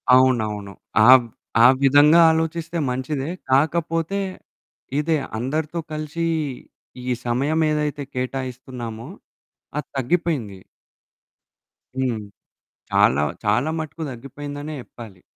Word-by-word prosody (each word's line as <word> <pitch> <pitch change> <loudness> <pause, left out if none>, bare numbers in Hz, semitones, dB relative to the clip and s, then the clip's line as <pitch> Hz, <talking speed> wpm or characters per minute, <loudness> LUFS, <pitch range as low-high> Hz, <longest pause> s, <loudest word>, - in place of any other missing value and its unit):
అవునవును. 110 -6 +2 0.4
ఆవ్ 130 -2 +8 0.4
ఆ - - +11 0.2
విధంగా 145 +4 +6
ఆలోచిస్తే 165 +1 -2
మంచిదే. 135 +3 -2 0.2
కాకపోతే 165 +6 +1 0.8
ఇదే. 160 +1 +1 0.2
అందరితో 155 +7 -2
కలిసీ 155 +2 -3 0.8
ఈ 125 - +1
సమయం 135 +7 +1
ఏదైతే 150 -1 -1
కేటాయిస్తున్నామో, 125 -2 -5 0.7
అది 150 - -5
తగ్గిపోయింది. 135 - -1 1.4
హ్మ్. 125 -5 -1 0.7
చాలా, 70 +3 +4 0.2
చాలా 120 +8 +2
మట్టుకు 160 +1 -5
తగ్గిపోయిందనే 145 +4 -7
జెప్పాలి. 110 -7 -12
135 Hz, 85 wpm, -22 LUFS, 125-155 Hz, 1.4 s, ఆ